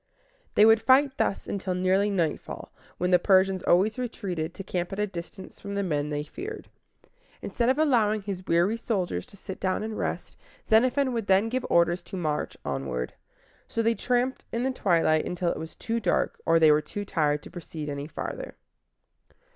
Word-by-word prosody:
They 210 - +7
would 225 0 +6
fight 270 +2 +4
thus - - 0
until 190 -2 -3
nearly 190 +3 +2
nightfall, 170 -6 -2 0.3
when 180 +1 0
the 180 - +6
Persians 190 0 +3
always 205 +8 +3
retreated, 185 -9 -4
to 195 - -6
camp 180 -2 -3
at 195 - -5
a 210 - +1
distance 185 0 -9
from 200 0 -6
the 200 - 0
men 150 -5 -1
they 150 0 -2
feared. 420 - -8 0.7
Instead 235 0 0
of 260 - +2
allowing 225 -9 +2
his 190 -2 -5
weary 175 +7 +2
soldiers 185 - -2
to 200 - -17
sit 190 0 -8
down 190 +2 -1
and 220 0 -4
rest, - - -4 0.3
Xenophon 255 +4 +3
would 225 -3 -2
then 195 +4 +4
give 255 +2 -2
orders 170 +1 +3
to 190 - -8
march 155 -4 -2
onward. 65 -3 -3 0.5
So 230 - -1
they 230 +1 +3
tramped 250 +2 0
in 230 +1 -1
the 265 - +1
twilight 165 -9 +2
until 175 -1 -1
it - - -4
was 160 0 -8
too 230 0 -2
dark - - 0
or 165 - +5
they 160 -1 +7
were 150 0 +4
too 205 +7 -6
tired 150 -5 0
to - - -11
proceed 160 -3 -7
any 140 0 -4
farther. 155 - -6
190 Hz, 185 wpm, -27 LUFS, 170-225 Hz, 0.7 s, They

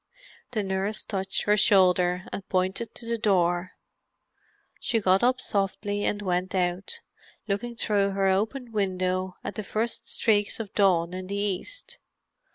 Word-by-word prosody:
The 215 -4 -1
nurse 195 +2 -1
touched 195 -2 -2
her 210 - +4
shoulder 185 -3 +4
and 195 - -6
pointed 190 +5 -1
to 235 - -6
the 230 0 -2
door; 180 -4 +2 1.1
she 235 -4 +1
got 190 -2 +3
up 250 +1 +3
softly 205 -1 -1
and 210 0 -1
went 185 0 -1
out, 185 - -1 0.5
looking 235 +4 -2
through 205 -3 +1
her 195 0 +1
open 220 +6 0
window 185 -2 -1
at - - -4
the 215 - -4
first 220 +3 -2
streaks 210 -2 +1
of 215 -3 -6
dawn 180 -4 +3
in 185 0 -5
the 200 - -3
east. 210 - -3
200 Hz, 150 wpm, -27 LUFS, 185-215 Hz, 1.1 s, her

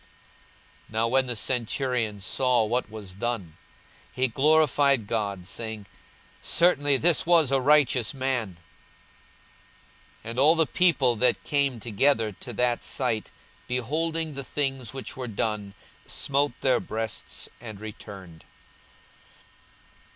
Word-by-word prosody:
42:023:047 - - -22
Now 110 +1 +1
when 130 +1 +2
the 120 - -1
centurion 115 -2 -1
saw 125 +3 +2
what 120 +1 -1
was 105 -4 -9
done, 100 -6 -4 0.6
he 130 +1 0
glorified 140 -2 +3
God, 100 -4 -3
saying, 110 +1 -5 0.6
Certainly 145 -5 +3
this 165 +2 +3
was 165 -6 +5
a 135 -1 +2
righteous 135 -4 +3
man. 130 - -2 1.7
42:023:048 115 - -5
And 120 - -3
all 155 +4 +6
the 165 -1 +3
people 145 -7 +2
that 125 +3 +2
came 140 -4 0
together 115 +1 +1
to 120 +5 -9
that 120 +1 +1
sight, 120 -5 -2 0.4
beholding 155 +6 -1
the 140 0 -5
things 135 -3 -2
which 135 0 -7
were 130 -1 -5
done, 105 -2 -3 0.3
smote 140 -1 0
their 130 -1 +3
breasts, 110 -1 -4
and 110 -4 -9
returned. 100 -5 -10
125 Hz, 120 wpm, -26 LUFS, 110-140 Hz, 1.7 s, all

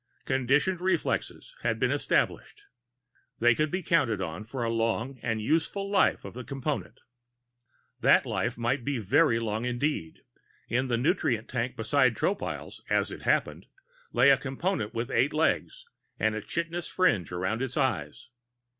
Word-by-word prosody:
Conditioned 135 +8 +1
reflexes 190 - -1
had - - 0
been - - +1
established. 415 - -1 0.7
They 120 0 +5
could 155 +5 0
be 185 +2 -3
counted 135 - +2
on 90 +1 -4
for 120 +2 -4
the 115 - 0
long 115 +3 -1
and 115 -2 -1
useful 165 - 0
life 195 - +3
of 100 - -8
the 125 +2 -7
Component. 140 +3 -4 1.0
That - - +5
life 120 +1 -2
might 120 +2 0
be 140 0 -1
very 120 - +3
long 110 -1 -2
indeed; 125 - -2 0.5
in 130 +2 0
the 120 -2 +1
nutrient 120 - +1
tank 125 0 -2
beside 125 +2 +2
Tropile's, 200 - -3
as - - +1
it - - -8
happened, - - 0 0.4
lay 140 - +6
a 135 - +5
Component 135 - -2
with 115 +1 -3
eight 145 - +2
legs 320 - 0 0.3
and 110 0 +2
a 110 - -3
chitinous 170 +6 -3
fringe 115 - +1
around 95 +6 -2
its 135 0 -3
eyes. 100 - -1
130 Hz, 155 wpm, -28 LUFS, 115-155 Hz, 1.0 s, lay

